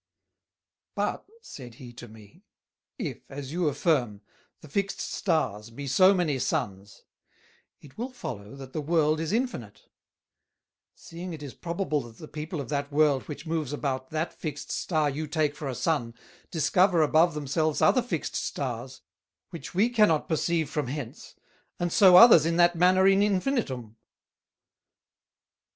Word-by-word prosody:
"But," - - -2 0.2
said 125 - -10
he 120 -1 -11
to 120 +1 -10
me, 105 -2 -16 0.6
"[if,] - - -4
as 135 0 -7
you 175 0 0
affirm, 135 - 0 0.4
the - - -12
fixed 195 +6 -2
Stars 115 - -1
be 140 +5 -8
so 185 +8 +5
many 170 -8 0
Suns, 100 -3 -3 0.8
it 145 +7 -16
will 245 +3 -3
follow 135 - -8
that 135 -1 -11
the 155 - -2
World 155 0 +1
is 160 0 -2
infinite; 215 - -3 1.1
seeing 175 +1 -8
it 150 -2 -8
is 140 - -8
probable 170 -3 -2
that 115 -2 -13
the 155 - -10
People 155 +2 -6
of 135 - -6
that 145 0 -2
World 145 -2 +2
which 150 +1 -8
moves 160 -4 -2
about 130 -3 -3
that 160 +2 -3
fixed 150 -3 -6
Star 155 -4 0
you 150 +2 -3
take 150 -1 0
for 150 -1 -6
a 130 - -4
Sun, 125 -8 -1 0.3
discover 180 +1 +3
above 160 +2 +3
themselves 150 +2 -1
other 255 - +4
fixed 230 -10 -4
Stars, 130 -1 -4 0.5
which 165 -2 -9
we 205 +5 +4
cannot 210 -10 +2
perceive 160 0 0
from 150 -1 -3
hence, 135 -3 -7 0.4
and 175 -1 -1
so 190 -4 +7
others 220 -6 +9
in 165 +1 0
that 175 0 +4
manner 185 +2 +4
in 195 0 +4
infinitum." 185 - -1
155 Hz, 150 wpm, -27 LUFS, 135-175 Hz, 1.1 s, others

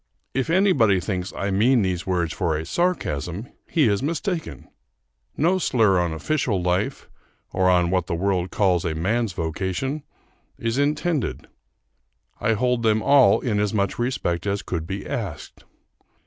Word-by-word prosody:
If 135 +3 -1
anybody 165 - +4
thinks 90 0 -3
I 100 0 -2
mean 115 +4 +3
these 90 -1 -2
words 90 -3 0
for 85 -5 0
a 80 - -5
sarcasm, 105 - -2 0.2
he 155 -7 +3
is 100 -2 +1
mistaken: 165 +3 -3 0.7
no 180 +5 +2
slur 110 - +3
on 85 -1 0
official 115 - -1
life, 90 +1 -1 0.5
or 95 0 +3
on 90 -1 +3
what 90 -3 0
the 85 - -1
world 95 0 0
calls 90 -4 +2
a 80 -3 -2
man's 105 +6 0
vocation, 95 - -3 0.6
is 115 +3 -1
intended. 150 0 0 0.9
I 115 - +2
hold 125 +2 +1
them 110 -1 +2
all 140 -2 +5
in 110 -5 0
as 105 +1 0
much 100 +1 0
respect 105 -8 -1
as 100 0 -1
could 80 -2 -4
be 95 +1 -5
asked. - - -6
100 Hz, 150 wpm, -23 LUFS, 90-130 Hz, 0.9 s, all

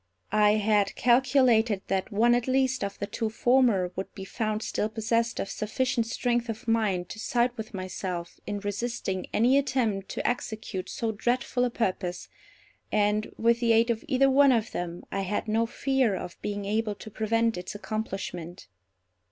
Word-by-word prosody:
I 210 -1 +5
had 210 -1 +2
calculated 240 -4 +3
that 190 -1 -1
one 230 +4 +4
at 245 0 +1
least 260 -2 +1
of 200 0 -4
the - - -3
two 220 +2 -3
former 225 -6 +3
would 190 - -5
be 195 - -7
found 215 +1 -2
still 210 - -1
possessed 230 +1 0
of - - -2
sufficient 230 +3 -1
strength 240 0 0
of 225 +3 -5
mind 210 -6 +1
to 220 - -8
side 240 +2 +1
with 220 -1 -7
myself 185 -2 -5
in 205 -1 -3
resisting 205 -2 -3
any 250 +5 +4
attempt 230 -8 -1
to - - -2
execute 220 -5 -3
so 225 -1 -2
dreadful 245 +3 0
a - - 0
purpose, 185 -6 -2 0.6
and, 210 0 +1
with 235 +1 +3
the 235 -1 +3
aid 230 +1 +4
of 225 - -3
either 270 -1 +4
one 275 +1 +6
of 230 -3 +1
them, 175 0 -4
I 195 - -1
had 200 +3 -2
no 225 +2 +1
fear 265 -4 +1
of 180 -1 -7
being 205 -1 -3
able 215 +1 -1
to 220 - -11
prevent 225 +2 +1
its 180 +3 -6
accomplishment. 195 -5 -5
220 Hz, 170 wpm, -27 LUFS, 200-240 Hz, 0.6 s, one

